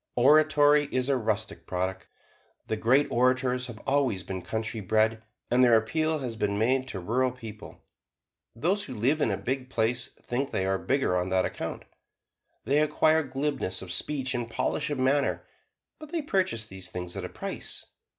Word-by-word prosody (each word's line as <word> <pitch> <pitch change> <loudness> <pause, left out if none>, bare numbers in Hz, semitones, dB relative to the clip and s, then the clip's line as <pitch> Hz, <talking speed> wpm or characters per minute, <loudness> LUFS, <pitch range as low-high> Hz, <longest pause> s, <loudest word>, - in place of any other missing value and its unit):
Oratory 150 +2 +5
is 130 -2 -1
a 140 - +3
rustic 110 -7 -2
product. 95 +1 -3 0.6
The 110 - -1
great 130 +6 +3
orators 125 +1 +2
have 120 -3 -8
always 135 -9 +1
been 95 -1 -5
country 110 +3 -3
bred, 110 +2 +1 0.3
and 125 +1 +5
their 120 -2 +7
appeal 155 +8 0
has 125 -5 -4
been 100 -2 -1
made 130 +4 +2
to 95 - -4
rural 125 +8 +1
people. 110 -4 -10 0.7
Those 185 - 0
who 130 - -7
live 135 +8 +1
in 120 - +3
a 100 - 0
big 130 0 -3
place 120 +1 0 0.2
think 135 +3 -1
they 95 - -1
are 95 0 0
bigger 135 -9 +1
on 90 +1 0
that 95 0 +2
account. - - -5 0.8
They 140 +5 +3
acquire 155 +1 +3
glibness 135 -9 -2
of 90 - -8
speech 135 +6 -2
and 120 -1 -3
polish 150 +6 -1
of 145 - -2
manner; 135 +2 +1 0.5
but 310 -1 -11
they 330 -3 -1
purchase 185 - 0
these 95 -3 -7
things 90 -1 -6
at - - -4
a - - -5
price. - - -6
125 Hz, 175 wpm, -28 LUFS, 110-140 Hz, 0.8 s, their